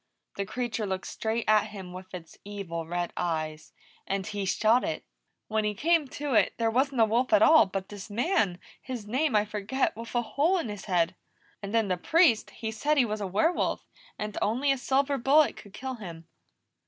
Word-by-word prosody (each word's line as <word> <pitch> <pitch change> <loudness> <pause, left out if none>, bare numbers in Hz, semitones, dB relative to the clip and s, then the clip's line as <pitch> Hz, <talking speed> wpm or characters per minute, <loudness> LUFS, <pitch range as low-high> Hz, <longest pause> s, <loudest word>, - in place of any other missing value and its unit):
The 200 -1 -3
creature 235 -3 -3
looked 190 -1 -3
straight 225 +1 -2
at 215 0 +4
him 190 -4 -9
with 185 +1 -10
its 165 -2 -10
evil 185 -5 -5
red 175 +1 -2
eyes, 155 -2 -3 0.4
and 195 -1 -1
he 205 -2 -3
shot 220 +6 +3
it. 155 - -3 0.4
When 220 0 0
he 210 0 -1
came 320 - +2
to 285 +1 -4
it, 220 - +3
there 230 -1 +1
wasn't 260 +1 +1
a - - +7
wolf 235 +4 +1
at 320 - +6
all, 315 -9 +7
but 190 0 -5
this 205 0 -9
man 220 - +1 0.2
his 250 -5 -6
name 260 +5 0
I 210 0 +4
forget 210 +5 -1
with 230 +2 -8
a 240 - +2
hole 300 +11 +1
in 325 -10 -3
his 205 -2 -7
head. 180 -2 +1 0.5
And 200 -1 -5
then 225 -2 +2
the 185 -1 0
Priest, 310 - +3
he 220 -1 -5
said 295 +7 0
he 255 - +5
was 215 -1 -3
a 200 - -2
werewolf, 265 - 0 0.3
and 210 -1 -5
only 255 +7 +2
a 275 - +1
silver 275 +2 +1
bullet 285 +5 +4
could 205 - -13
kill 260 +3 -5
him. 170 -8 -9
215 Hz, 205 wpm, -28 LUFS, 195-260 Hz, 0.5 s, a